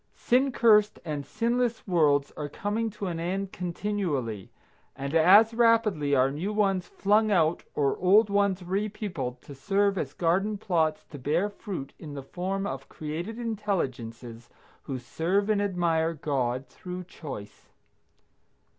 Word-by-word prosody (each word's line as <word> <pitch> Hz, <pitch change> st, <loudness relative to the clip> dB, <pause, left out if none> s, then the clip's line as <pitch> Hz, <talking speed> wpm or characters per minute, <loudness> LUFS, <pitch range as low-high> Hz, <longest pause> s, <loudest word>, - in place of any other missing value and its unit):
Sin 260 Hz, +3 st, +2 dB
cursed 210 Hz, -4 st, +4 dB
and 150 Hz, -3 st, -3 dB
sinless 235 Hz, 0 st, -1 dB
worlds 150 Hz, -6 st, +3 dB
are 150 Hz, -1 st, -4 dB
coming 210 Hz, +8 st, -2 dB
to 210 Hz, -1 st, -6 dB
an 170 Hz, -3 st, -3 dB
end 190 Hz, +3 st, -2 dB
continually, 170 Hz, -, -3 dB, 0.5 s
and 140 Hz, +2 st, -5 dB
as 195 Hz, +8 st, +6 dB
rapidly 225 Hz, -11 st, +3 dB
are 130 Hz, +1 st, +3 dB
new 170 Hz, +9 st, -3 dB
ones 195 Hz, -4 st, +1 dB
flung 210 Hz, +2 st, +2 dB
out 170 Hz, -4 st, +2 dB
or 140 Hz, -2 st, +2 dB
old 200 Hz, +4 st, +5 dB
ones 200 Hz, -2 st, +1 dB
re 195 Hz, +4 st, -1 dB
peopled 145 Hz, -, -5 dB
to 145 Hz, -, -10 dB
serve 195 Hz, +7 st, +1 dB
as -, -, -4 dB
garden 195 Hz, +5 st, +1 dB
plots 165 Hz, -6 st, 0 dB
to 145 Hz, -, -10 dB
bear 160 Hz, +10 st, +1 dB
fruit 185 Hz, -10 st, -6 dB
in 150 Hz, -3 st, -8 dB
the 140 Hz, -, -6 dB
form 190 Hz, +7 st, -3 dB
of 135 Hz, -6 st, -5 dB
created 165 Hz, +9 st, -5 dB
intelligences 130 Hz, -, -4 dB, 0.4 s
who 135 Hz, -, -3 dB
serve 180 Hz, -, 0 dB
and 205 Hz, -1 st, +2 dB
admire 170 Hz, -4 st, +1 dB
God 130 Hz, -4 st, -1 dB
through 180 Hz, 0 st, -7 dB
choice. 135 Hz, -, -9 dB
180 Hz, 145 wpm, -27 LUFS, 145-205 Hz, 0.5 s, as